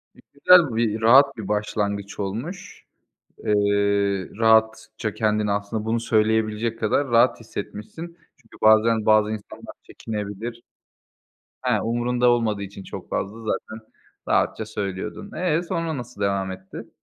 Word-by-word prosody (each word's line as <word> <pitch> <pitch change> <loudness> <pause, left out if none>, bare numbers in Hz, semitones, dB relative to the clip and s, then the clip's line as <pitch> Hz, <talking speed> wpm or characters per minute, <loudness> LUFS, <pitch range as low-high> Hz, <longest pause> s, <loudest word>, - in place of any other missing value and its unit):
E, - - -20
güzel 145 -2 +5
bir, 110 -1 0
rahat 135 +4 +6
bir 105 - -6
başlangıç 105 -1 -2
olmuş. 125 - -6 0.6
Eee, 100 -2 +1
rahatça 110 -1 +2
kendini 105 -1 0
aslında 105 +2 -3
bunu 115 +1 0
söyleyebilecek 110 0 0
kadar 115 +6 +1
rahat 115 0 +3
hissetmişsin. 165 +11 -8 0.2
Çünkü 120 -4 -20
bazen 110 0 +4
bazı 110 0 +4
insanlar 110 -2 -8
çekinebilir. 110 +2 -6 1.0
Ha, - - +1
umurunda 120 +2 +1
olmadığı 115 -4 +1
için 100 0 -8
çok - - -9
fazla 105 +4 -3
zaten 110 0 -5 0.4
rahatça 110 - +1
söylüyordun. 105 - -5
Eee, 175 -2 0
sonra 165 -3 -3
nasıl 120 -4 -9
devam 100 -1 0
etti? 95 +1 -10
110 Hz, 125 wpm, -23 LUFS, 105-120 Hz, 1.0 s, rahat